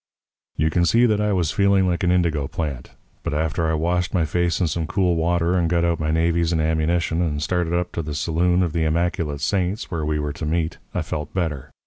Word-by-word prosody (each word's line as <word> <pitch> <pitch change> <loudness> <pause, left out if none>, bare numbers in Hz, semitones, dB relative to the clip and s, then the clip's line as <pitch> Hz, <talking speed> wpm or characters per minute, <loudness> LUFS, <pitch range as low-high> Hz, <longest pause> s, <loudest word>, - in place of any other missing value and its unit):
"You 80 +1 +1
can 85 - +2
see 115 +7 +4
that 105 -3 +2
I 105 0 +1
was 90 -5 +1
feeling 100 -1 +3
like 85 -1 -1
an 90 - +2
indigo 85 -6 +1
plant; 70 -6 -4 0.3
but 75 - -3
after 80 +1 0
I 80 - +1
washed 90 +3 0
my 85 -3 +2
face 85 +2 0
in 90 - +2
some 80 0 -2
cool 90 0 +1
water, 85 +1 +1
and 85 -2 +1
got 85 0 +2
out 85 -1 0
my 75 0 -1
navys 85 +1 +1
and 80 - +1
ammunition, 80 +2 +1
and 75 -4 -1
started 85 +2 -1
up 90 0 -1
to 85 - -3
the 75 -2 -5
Saloon 90 +4 +1
of 85 -3 -2
the 85 - 0
Immaculate 80 -2 -1
Saints 95 +5 -1
where 80 -3 -2
we 75 0 0
were 75 -1 -2
to 80 - -5
meet, 80 0 -1
I - - -2
felt 75 -1 -5
better. 75 -6 -2
85 Hz, 235 wpm, -22 LUFS, 80-90 Hz, 0.3 s, see